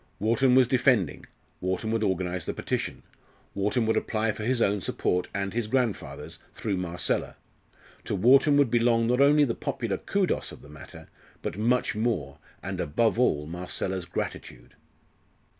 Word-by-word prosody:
Wharton 125 +4 +3
was 130 -2 +6
defending, 125 - +2 0.3
Wharton 95 +4 -2
would 115 -1 0
organise 90 -4 -1
the - - -3
petition, - - -3 0.5
Wharton 105 +4 0
would 110 - +1
apply 110 -1 0
for 105 - -8
his 125 +2 +1
own 100 -3 +1
support 90 0 -1
and 100 -1 -3
his 115 -2 -1
grandfather's, 125 -3 -2 0.2
through 100 -4 -2
Marcella. 90 -1 -2 0.7
To - - -2
Wharton 135 +8 +5
would 140 -5 +3
belong 115 -1 +3
not 125 +3 +2
only 145 +1 +6
the 125 -5 +1
popular 110 -5 -3
kudos 195 -2 -1
of - - -12
the - - -15
matter, 75 -1 -12 0.4
but - - -3
much 120 +4 +1
more, 100 - -2 0.2
and - - -3
above 110 +10 +1
all, 75 -12 +2
Marcella's 90 +2 -4
gratitude. 60 -7 -6
110 Hz, 155 wpm, -27 LUFS, 90-125 Hz, 0.7 s, was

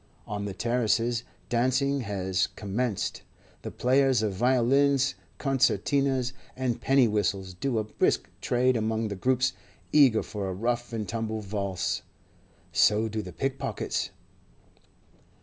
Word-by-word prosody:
On 100 -1 -4
the 100 - -4
terraces 120 +1 +1 0.2
dancing 130 +4 +1
has 95 -5 -1
commenced; 100 -2 -2 0.4
the - - -5
players 130 -1 +2
of 105 -2 0
violins, 130 +5 +3 0.2
concertinas, 135 -1 +1 0.2
and 125 -2 -2
penny 135 -2 +4
whistles 100 -3 -1
do 120 +6 -2
a 110 - +1
brisk 105 - 0
trade 125 +1 +2
among 110 0 0
the 100 - -4
groups 130 +6 +1 0.4
eager 135 -7 +6
for 100 -2 -4
a - - -3
rough 120 +4 -1
and 110 -3 -3
tumble 110 -1 -3
valse; 100 -3 -2 0.7
so 110 +1 +4
do 110 0 -3
the 90 - -8
pickpockets. 135 +3 -2
115 Hz, 125 wpm, -27 LUFS, 105-130 Hz, 0.7 s, eager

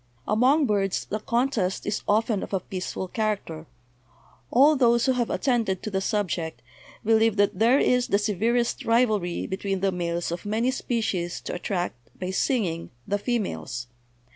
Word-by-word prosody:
"Among 260 +8 +4
birds 200 -4 0
the 215 - -3
contest 235 -5 0
is 210 - -1
often 215 0 +2
of - - -7
a 195 - +2
peaceful 185 0 -5
char 215 +1 0
acter. 160 -4 -10 0.8
All 285 +5 +6
those 235 -3 +3
who 265 - +3
have 245 -2 0
attended 230 - 0
to 215 - -4
the 190 -1 0
subject 175 - -2 0.4
believe 225 -1 +4
that 200 -2 +1
there 235 +4 +5
is 250 -2 +2
the 200 - +3
severest 225 +4 0
rivalry 215 -7 +1
between 195 0 -3
the 195 0 +2
males 170 -1 -2
of 170 - -4
many 225 +5 0
species 210 -9 -2
to - - -5
attract, 175 - -4
by 185 0 -3
singing, 190 -6 0 0.2
the 205 - 0
females. 125 - -2
205 Hz, 160 wpm, -25 LUFS, 185-235 Hz, 0.8 s, All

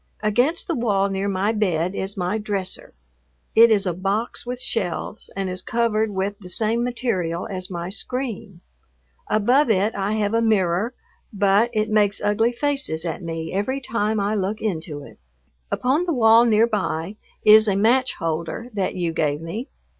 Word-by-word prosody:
Against 245 +11 +1
the 340 - 0
wall 205 -7 +1
near 195 +1 -2
my 195 +2 0
bed 185 -5 0
is 195 +1 -4
my 185 +4 -1
"dresser." 200 -3 -4 0.6
It 230 +1 +7
is 210 -2 +3
a 180 - 0
box 200 +7 -2
with 250 0 -4
shelves 210 -3 -3
and 195 -1 -2
is 185 0 -4
covered 220 -1 0
with 200 +1 -3
the 185 -3 -10
same 225 +5 +1
material 210 -9 -2
as 185 -3 -4
my 175 -1 -4
screen. 220 -4 -5 0.7
Above 245 +7 +3
it 210 +1 +2
I 200 +1 -1
have 210 -1 0
a 230 - +2
mirror, 210 +1 +1 0.4
but 200 +2 +3
it 215 -1 -1
makes 205 -2 +3
ugly 225 +3 +1
faces 270 - 0
at 165 +2 -3
me 165 -1 -5
every 235 +8 -1
time 220 -4 -1
I 200 +1 0
look 205 +1 -1
into 160 -8 -4
it. - - -14 0.5
Upon 280 +8 +1
the 340 - 0
wall 230 -2 +6
near 225 -1 +4
by 200 -4 -2 0.3
is 215 +1 +8
a 200 - +2
match 245 +6 +2
holder 165 +9 -4
that 195 -3 -2
you 170 -2 -1
gave 150 -2 0
me. 205 - -6
205 Hz, 170 wpm, -22 LUFS, 185-230 Hz, 0.7 s, is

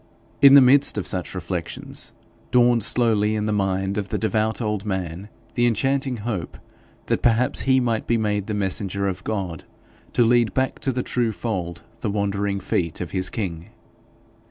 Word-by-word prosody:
In 140 0 +9
the 140 - +10
midst 135 -1 +5
of 105 - -2
such 90 0 -3
reflections, 90 -2 -5 0.4
dawned 120 -1 +4
slowly 110 -1 +2
in 105 -1 -1
the 105 - 0
mind 95 0 0
of 100 - -5
the - - -1
devout 110 0 0
old 105 -4 -2
man 95 -1 -4 0.2
the 120 -1 +2
enchanting 130 +3 0
hope 105 -8 -4 0.5
that - - 0
perhaps 120 +1 +2
he 130 -1 +3
might 115 -3 -1
be 120 - +2
made 105 -2 -1
the 105 - -2
messenger 100 0 -1
of 95 -1 -4
God 95 -7 -3 0.5
to 120 - +4
lead 120 -1 +3
back 130 0 0
to 135 - 0
the 125 0 -2
true 120 -2 0
fold 90 -6 -4 0.2
the 110 - -2
wandering 100 -1 -1
feet 85 -3 -2
of 90 - -5
his 95 -1 -1
king. 85 -7 -5
105 Hz, 175 wpm, -23 LUFS, 95-120 Hz, 0.5 s, the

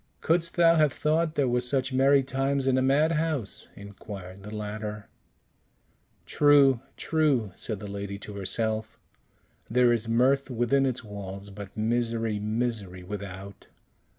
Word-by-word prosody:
"Couldst 165 0 +1
thou 170 -1 +5
have 150 -2 +4
thought 155 +3 0
there 140 -2 +2
were 125 0 +1
such 130 +1 -1
merry 135 +1 +4
times 135 +1 -1
in 135 -1 +3
a 130 - +2
madhouse?" 150 -2 +1
inquired 100 -2 -10
the 100 - -9
latter. 105 0 -5 1.2
"True, 140 -4 +5 0.2
true," 145 - +1
said 110 -4 -5
the 105 - -8
lady 100 0 -5
to 105 +1 -9
herself; 110 +2 -2 0.7
"there 125 0 +4
is 115 -1 -2
mirth 130 +4 +2
within 125 +3 +2
its 130 -1 -2
walls, 100 -1 -8
but 100 0 -10
misery, 115 -1 0
misery 105 -4 -3
without." 100 0 -8
115 Hz, 135 wpm, -27 LUFS, 105-135 Hz, 1.2 s, thou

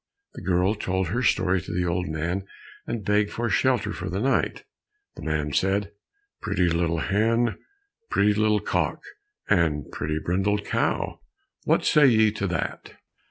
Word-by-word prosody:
The - - -9
girl 90 +2 +2
told 95 -4 -2
her 120 +6 -1
story 90 -6 +2
to - - -8
the 90 +1 0
old 90 +1 -1
man, 85 +5 -3 0.4
and 115 -3 -4
begged 105 0 +2
for 120 0 -2
shelter 125 -5 +1
for 90 - -5
the 95 +3 -2
night. 135 +5 0 0.5
The - - -10
man 75 -2 -2
said, 100 +4 +1 0.5
"Pretty 95 -4 +1
little 85 0 0
hen, 115 +6 +1 0.5
Pretty 105 +1 +3
little 105 0 +2
cock, - - -1 0.4
And 80 -7 +1
pretty 75 +1 -2
brindled 95 +5 0
cow, - - -1 0.5
What - - +2
say 150 -2 +6
ye 110 -3 +4
to 100 -1 -3
that?" 85 -3 -4
95 Hz, 155 wpm, -25 LUFS, 85-105 Hz, 0.5 s, say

